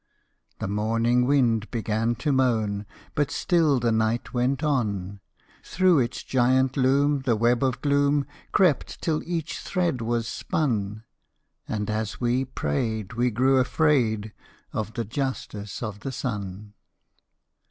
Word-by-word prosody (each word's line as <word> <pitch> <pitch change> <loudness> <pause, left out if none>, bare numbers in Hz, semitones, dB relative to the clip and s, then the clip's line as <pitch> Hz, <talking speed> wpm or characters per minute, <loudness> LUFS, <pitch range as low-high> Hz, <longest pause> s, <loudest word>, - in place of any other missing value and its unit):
The - - -3
morning 115 +4 +1
wind 120 -6 +2
began 115 0 -1
to 145 +6 -1
moan, 110 -6 +1 0.3
But 145 -1 +1
still 160 -7 +2
the 120 -1 +1
night 110 +1 0
went 130 +4 0
on: 100 -9 -1 0.4
Through 185 -4 +3
its 120 -1 -2
giant 130 +1 +2
loom 140 +2 +3
the 130 -3 +1
web 120 +4 +2
of 130 -1 0
gloom 140 0 +2 0.3
Crept 180 -7 +2
till 155 -2 0
each 165 -3 -3
thread 175 -9 -1
was 115 0 -1
spun: 110 -10 -2 0.6
And, 105 -2 -2
as 110 -1 -3
we 125 +2 +1
prayed, 110 - -2
we 120 +2 +1
grew 130 +4 +3
afraid 125 -6 +1 0.4
Of 110 +1 -3
the 115 -2 -2
Justice 115 -4 -4
of 110 -3 -5
the 135 - -5
Sun. 105 -5 -5
120 Hz, 130 wpm, -25 LUFS, 110-135 Hz, 0.6 s, Through